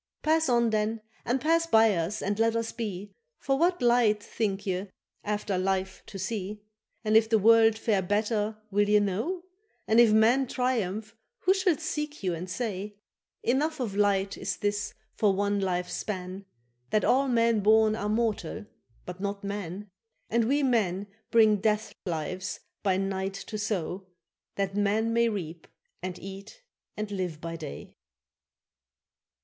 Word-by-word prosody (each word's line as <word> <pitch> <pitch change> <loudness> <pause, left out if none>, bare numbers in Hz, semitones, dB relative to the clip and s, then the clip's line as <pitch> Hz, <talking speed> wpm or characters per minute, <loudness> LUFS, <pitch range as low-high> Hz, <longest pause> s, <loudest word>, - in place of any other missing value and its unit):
—Pass 320 -1 +3
on 235 -2 +3
then 215 +1 0 0.2
and 245 +3 +1
pass 330 +4 +2
by 225 -6 +5
us 175 +4 -2
and 205 +2 -1
let 225 0 +3
us 230 0 -1
be, 205 -4 -5 0.2
For 270 - 0
what 350 -2 +2
light 235 -4 +4
think 205 -3 -2
ye 190 +1 -2 0.4
after 205 -2 -1
life 190 0 -1
to 200 - -8
see? 205 +1 -4 0.4
And 215 -1 +1
if 220 0 +5
the 225 - +5
world 225 +1 +5
fare 215 -3 +1
better 210 +2 0
will 205 +1 +2
ye 210 0 +6
know? 220 - -1 0.4
And 220 +2 +4
if 235 -2 +7
man 235 +5 +4
triumph 225 -4 -1 0.3
who 375 - +4
shall 375 -5 +2
seek 300 -4 -4
you 180 -2 0
and 175 +2 -5
say? 205 -1 -4 0.5
—Enough 290 +6 +1
of 225 -6 -3
light 200 -1 +1
is 190 -2 -3
this 205 0 -2 0.2
for 205 -3 +2
one 205 +1 +1
life's 180 -2 -1
span, 190 -1 -5 0.4
That 215 - +2
all 275 +2 +3
men 230 -3 +3
born 215 +1 +4
are 210 -1 -3
mortal, 220 -1 -1 0.4
but 180 0 -7
not 200 0 -3
man: 200 0 -5 0.4
And 230 0 +3
we 285 +5 +2
men 205 -7 +1 0.2
bring 220 -2 +5
death 210 +1 0
lives 180 +3 -3 0.2
by 190 -2 +2
night 195 0 -2
to 215 +2 -6
sow, 190 -3 -3 0.5
That 195 -1 -1
man 210 +3 +1
may 235 0 +3
reap 170 -6 -5 0.3
and 180 0 -4
eat 195 - -10 0.3
and 215 -1 -4
live 180 -5 -3
by 165 +1 -5
day. 155 -3 -8
210 Hz, 155 wpm, -28 LUFS, 195-230 Hz, 0.5 s, if